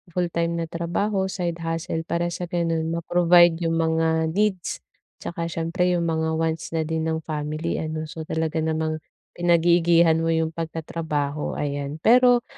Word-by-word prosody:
fulltime 170 -1 0
na - - -3
trabaho, 190 +4 -1
side 175 -3 -3
hustle 165 0 -2
para 170 0 0
sa 175 +1 -4
gano'n 165 -2 -1
ma-provide 175 0 +4
yung 165 - 0
mga 160 0 +1
needs, 195 -1 0 0.4
tsaka 170 -1 -4
siyempre 170 +3 0
yung 170 - 0
mga 160 0 0
wants 165 0 -2
na 160 - +1
din 160 -1 -1
ng 160 0 -1
family 155 +1 -3
ano, 155 0 -3
so 160 +1 -7
talaga 160 0 -1
namang 160 0 -1 0.4
pinag-iigihan 170 -1 +4
mo 165 - 0
yung 160 -1 +1
pagtatrabaho 160 -3 -3
ayan. 145 0 -3
Pero, 245 0 +5
165 Hz, 150 wpm, -24 LUFS, 160-175 Hz, 0.4 s, Pero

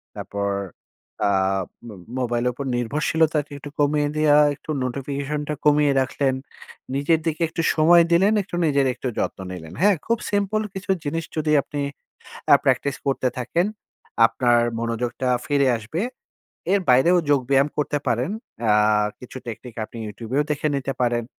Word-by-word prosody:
তারপর 100 0 -3 0.8
আ - - +2 0.6
ম - - -8 0.3
মোবাইলের 120 0 0
উপর 140 +3 -6
নির্ভরশীলতাটি 150 +4 0
একটু 145 +1 -9
কমিয়ে 145 0 +2
দেওয়া, 150 -1 +4 0.2
একটু - - -22
নোটিফিকেশন 140 +3 -3
টা 150 - -1
কমিয়ে 150 -1 +4
রাখলেন। 130 +1 0 0.6
নিজের 155 +3 +2
দিকে 160 0 -2
একটু 165 - -3
সময় 170 +2 +6
দিলেন, 195 +5 +4
একটু 175 - -7
নিজের 140 -3 +2
একটু 130 +1 -5
যত্ন - - -2
নিলেন, 85 -3 -8
হ্যাঁ? 205 -1 +5
খুব 230 +1 +1
সিম্পল 205 +1 +1
কিছু 190 0 -3
জিনিস 165 +3 -2
যদি 155 0 0
আপনি 145 +1 -5 0.7
অ্যা - - +8
প্র্যাকটিস 140 -2 +1
করতে 135 -1 +1
থাকেন, 145 +8 0 0.6
আপনার 120 0 +3 0.2
মনোযোগটা 120 +2 -2 0.2
ফিরে 140 -2 +2
আসবে। 115 +10 -4 0.7
এর 200 - +4
বাইরেও 130 +8 +5
যোগব্যায়াম 140 +1 +3
করতে 150 0 0
পারেন। 120 - 0 0.3
অ্যা 105 -2 +3 0.5
কিছু 125 +1 -11
টেকনিক 115 +1 -8
আপনি 115 - -12
YouTube 110 +3 -8
এও 145 - +4
দেখে 150 +1 0
নিতে 135 0 -2
পারেন। 120 -1 +1
140 Hz, 150 wpm, -23 LUFS, 125-155 Hz, 0.8 s, অ্যা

